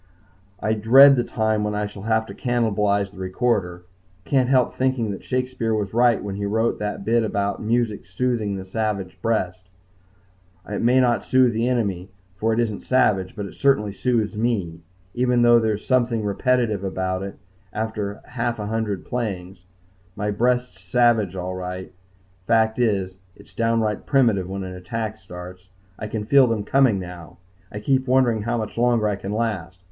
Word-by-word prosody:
I 110 - 0
dread 130 +6 +7
the 120 - +1
time 110 -2 0
when 105 0 -2
I 105 0 -1
shall 105 -1 -9
have 110 +1 +1
to - - -9
cannibalize 105 -5 0
the 95 - -14
recorder. 95 -2 -1 0.4
Can't 130 -3 +2
help 130 -2 +3
thinking 130 -4 0
that 100 - -7
Shakespeare 125 -3 -1
was 105 -2 -3
right 120 0 +3
when 100 -1 -5
he 100 - -3
wrote 110 +3 0
that 105 -1 -4
bit 115 +2 +2
about 100 -2 -2
music 110 -4 -1
soothing 110 +1 -1
the 95 -1 -6
savage 95 -2 -3
breast. 95 -5 -2 1.0
It 105 - -3
may 125 +3 +4
not 120 -2 +2
soothe 130 -2 +3
the 115 +2 0
enemy, 100 -7 -1 0.3
for 110 +4 0
it 110 - 0
isn't 110 -4 -1
savage, 105 -8 +1
but 105 -2 -4
it 100 - -9
certainly 105 -8 +1
soothes 110 -1 0
me, 105 -8 -1 0.3
even 125 -1 +2
though 120 0 +6
there's 110 -2 -1
something 120 -3 +1
repetitive 110 0 0
about 95 -1 -2
it 100 0 -6 0.3
after 110 -2 -3
a - - -19
half 120 -1 -2
a 105 - -4
hundred 105 -3 -2
playings. 95 -6 -4 0.5
My 105 0 -2
breast's 125 -2 0
savage 110 -1 +2
all 90 0 -4
right. 90 0 -6 0.5
Fact 110 0 +2
is, 95 -6 0 0.2
it's - - -18
downright 115 -2 0
primitive 115 -10 +2
when 95 0 -4
an 95 0 -6
attack 110 +4 -4
starts. 90 -1 -11 0.3
I 110 - -4
can 105 0 -4
feel 135 +2 +5
them 115 -3 -1
coming 130 -1 +3
now. 90 -3 -9 0.3
I 105 - -5
keep 130 +3 +1
wondering 125 -4 +3
how 120 +3 -1
much 110 0 -4
longer 120 -3 +3
I 105 - 0
can 95 0 -6
last. 105 -5 -2
110 Hz, 175 wpm, -23 LUFS, 100-120 Hz, 1.0 s, dread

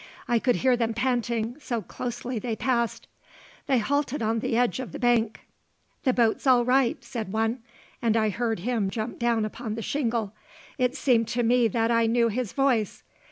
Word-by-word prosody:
I 240 -1 +2
could 245 +1 +2
hear 255 -1 +3
them 230 -2 -1
panting, 240 -1 -1
so 235 -7 -3
closely 240 +4 -4
they 225 +1 -3
passed. 235 0 -1 0.6
They 270 -3 +3
halted 280 +2 0
on 225 +1 +1
the 225 - -1
edge 245 +1 +1
of 260 - -6
the - - -4
bank. 235 -3 +1 0.6
"The 260 - +5
boat's 235 +1 +1
all 245 -2 +5
right," 255 -1 +3
said 220 -5 -5
one; 225 +3 0 0.4
and 230 -1 +2
I 215 -1 +2
heard 225 -1 -2
him 225 -2 0
jump 220 +3 -4
down 235 -2 +1
upon 215 0 -5
the 225 - -5
shingle. 230 -7 -1 0.5
It 250 +1 +1
seemed 240 -6 +2
to 240 +1 -1
me 240 0 +4
that 225 +2 0
I 230 -1 +3
knew 235 0 +3
his 230 -1 -2
voice. 255 -7 0
235 Hz, 185 wpm, -26 LUFS, 225-250 Hz, 0.6 s, The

